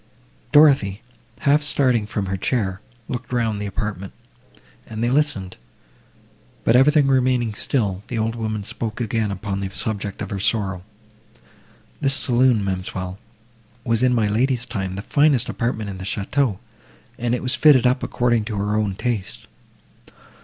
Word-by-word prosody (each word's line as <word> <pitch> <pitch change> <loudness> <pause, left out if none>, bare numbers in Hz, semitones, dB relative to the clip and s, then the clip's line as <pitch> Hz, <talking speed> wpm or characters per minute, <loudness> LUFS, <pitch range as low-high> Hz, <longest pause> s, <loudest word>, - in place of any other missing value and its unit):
Dorothée, 135 -9 +5 0.4
half 145 +1 +4
starting 130 -7 +2
from 105 -1 -3
her 95 +1 -2
chair, 95 -2 -1 0.3
looked 125 0 -5
round 115 -4 0
the 105 - -3
apartment, 100 -2 -4 0.7
and 110 +1 -5
they 120 - +1
listened—but, 95 - -4
everything 145 +3 +5
remaining 130 -4 +2
still, 100 -5 -1
the 120 - -4
old 110 +1 0
woman 110 -2 -3
spoke 110 +2 -5
again 110 -2 -1
upon 100 0 -4
the 95 -1 -3
subject 100 0 -3
of - - -7
her 100 - -3
sorrow. 95 -3 0 1.2
"This 135 0 +2
saloon, 125 -4 +3
ma'amselle, 95 0 -4 0.7
was 115 -1 +1
in 125 -1 +3
my 110 -3 +2
lady's 120 +4 +1
time 95 -6 -4
the 100 - -5
finest 145 -2 +2
apartment 115 -3 -2
in 95 -2 -6
the - - -6
château, 105 +3 -1 0.6
and 120 0 0
it - - -5
was 125 - +2
fitted 145 -6 +5
up 125 +1 +2
according 120 -2 +1
to 110 - -4
her 105 +1 -1
own 105 -3 0
taste. 110 -3 -3
110 Hz, 150 wpm, -22 LUFS, 100-125 Hz, 1.2 s, Dorothée